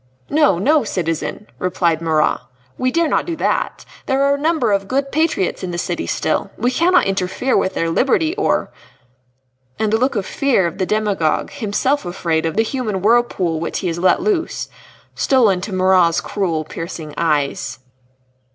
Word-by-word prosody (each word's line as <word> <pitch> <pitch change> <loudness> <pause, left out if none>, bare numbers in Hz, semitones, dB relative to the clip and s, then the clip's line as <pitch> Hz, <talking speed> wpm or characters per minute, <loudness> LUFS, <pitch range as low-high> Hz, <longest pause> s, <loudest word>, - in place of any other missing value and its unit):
"No, 300 - +4
no, 290 - +3
citizen," 165 +3 -3
replied 175 -3 0
Marat, 160 -2 +1 0.4
"we 255 - 0
dare 335 +4 +1
not - - 0
do 340 - -2
that. - - -1 0.2
There 270 0 +2
are 280 0 +3
a - - 0
number 310 -8 +1
of 195 -1 0
good 275 +4 -1
patriots 315 - 0
in 185 - -4
the 175 - -4
city - - -3
still. - - -1
We 245 - +1
cannot 350 +7 +3
interfere 195 +6 -1
with 190 - +1
their 165 - 0
liberty 315 - +2
or 410 - 0 0.5
" 125 0 -44
And 220 -1 0
the 220 - +3
look 255 +1 +1
of 200 -3 -1
fear 265 -8 +1
of 170 +3 -4
the 185 - 0
demagogue 205 -7 0
himself 265 +3 -1
afraid 165 -3 -1
of 165 - -4
the 225 - +4
human 220 -6 -3
whirlpool 205 -7 +2
which 165 - -3
he 185 - -2
has 165 0 -3
let 185 - +3
loose 370 -6 -1 0.4
stole 255 -6 +3
into 185 +3 -3
Marat's 185 -3 +3
cruel, 170 -6 -2
piercing 160 -1 -7
eyes. 145 -4 -1
195 Hz, 175 wpm, -19 LUFS, 170-265 Hz, 0.5 s, No